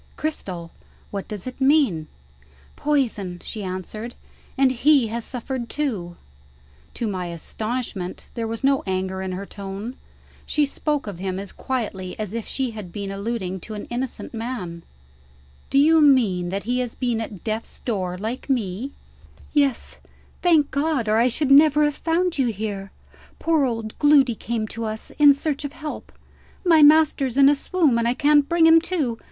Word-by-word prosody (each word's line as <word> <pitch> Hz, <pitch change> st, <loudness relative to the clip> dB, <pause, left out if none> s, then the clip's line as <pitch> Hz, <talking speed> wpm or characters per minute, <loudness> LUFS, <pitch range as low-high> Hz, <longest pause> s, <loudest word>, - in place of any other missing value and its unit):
"Cristel! 185 Hz, -, -4 dB, 0.4 s
what 200 Hz, -1 st, -4 dB
does 210 Hz, -4 st, -6 dB
it 255 Hz, +1 st, -7 dB
mean?" 265 Hz, -, +3 dB, 0.7 s
"Poison," 225 Hz, -12 st, -1 dB
she 215 Hz, -, -6 dB
answered. 195 Hz, +5 st, -6 dB, 0.4 s
"And 265 Hz, -1 st, +4 dB
he 260 Hz, -1 st, +4 dB
has 230 Hz, +1 st, -3 dB
suffered 250 Hz, -1 st, -5 dB
too." 210 Hz, -13 st, -2 dB, 0.8 s
To 235 Hz, -, -2 dB
my 185 Hz, -3 st, -3 dB
astonishment, 200 Hz, +2 st, -4 dB
there 230 Hz, -2 st, -3 dB
was 225 Hz, +2 st, -5 dB
no 275 Hz, 0 st, +3 dB
anger 190 Hz, 0 st, -2 dB
in 190 Hz, -1 st, -3 dB
her 195 Hz, +2 st, -5 dB
tone: 200 Hz, +5 st, -7 dB, 0.5 s
she 300 Hz, -1 st, +1 dB
spoke 295 Hz, +1 st, -2 dB
of 200 Hz, -5 st, -7 dB
him 190 Hz, 0 st, -3 dB
as 195 Hz, 0 st, -6 dB
quietly 205 Hz, -8 st, -4 dB
as 215 Hz, -2 st, -4 dB
if 230 Hz, -1 st, -4 dB
she 260 Hz, -3 st, -2 dB
had 210 Hz, -5 st, -8 dB
been 200 Hz, 0 st, -5 dB
alluding 195 Hz, -2 st, -3 dB
to 215 Hz, +4 st, -8 dB
an 210 Hz, -, -6 dB
innocent 250 Hz, +1 st, -4 dB
man. 225 Hz, -8 st, -5 dB, 0.9 s
"Do -, -, +1 dB
you 315 Hz, +3 st, +6 dB
mean 220 Hz, -12 st, +4 dB
that 195 Hz, +2 st, -3 dB
he 245 Hz, +3 st, 0 dB
has 245 Hz, -2 st, -3 dB
been 240 Hz, -3 st, -1 dB
at 210 Hz, -4 st, -7 dB
death's 220 Hz, 0 st, -4 dB
door, 185 Hz, -6 st, -2 dB
like 225 Hz, +8 st, -5 dB
me?" 235 Hz, +1 st, -1 dB, 0.6 s
"Yes, 280 Hz, -4 st, 0 dB, 0.4 s
thank 320 Hz, -5 st, +4 dB
God 280 Hz, -4 st, 0 dB
or 215 Hz, +1 st, +3 dB
I 235 Hz, +2 st, +4 dB
should 270 Hz, +3 st, 0 dB
never 300 Hz, +1 st, +7 dB
have 295 Hz, -1 st, +1 dB
found 335 Hz, 0 st, 0 dB
you 260 Hz, -, +3 dB
here. 205 Hz, -3 st, -4 dB, 0.5 s
Poor 320 Hz, -4 st, +2 dB
old 225 Hz, -3 st, -3 dB
Gloody 285 Hz, -4 st, +5 dB
came 225 Hz, 0 st, -3 dB
to 230 Hz, -, -5 dB
us, 220 Hz, 0 st, -5 dB
in 290 Hz, -1 st, +9 dB
search 290 Hz, 0 st, -2 dB
of 285 Hz, 0 st, -5 dB
help. 305 Hz, -1 st, -7 dB, 0.5 s
'My 325 Hz, -3 st, +6 dB
master's 295 Hz, -4 st, +5 dB
in 275 Hz, -1 st, +7 dB
a 290 Hz, -, +4 dB
swoon, 290 Hz, -4 st, +1 dB
and 230 Hz, -, +1 dB
I 240 Hz, -, +1 dB
can't 290 Hz, +1 st, +4 dB
bring 340 Hz, -1 st, +4 dB
him 325 Hz, 0 st, +7 dB
to.' 300 Hz, -10 st, -1 dB
235 Hz, 170 wpm, -23 LUFS, 200-285 Hz, 0.9 s, in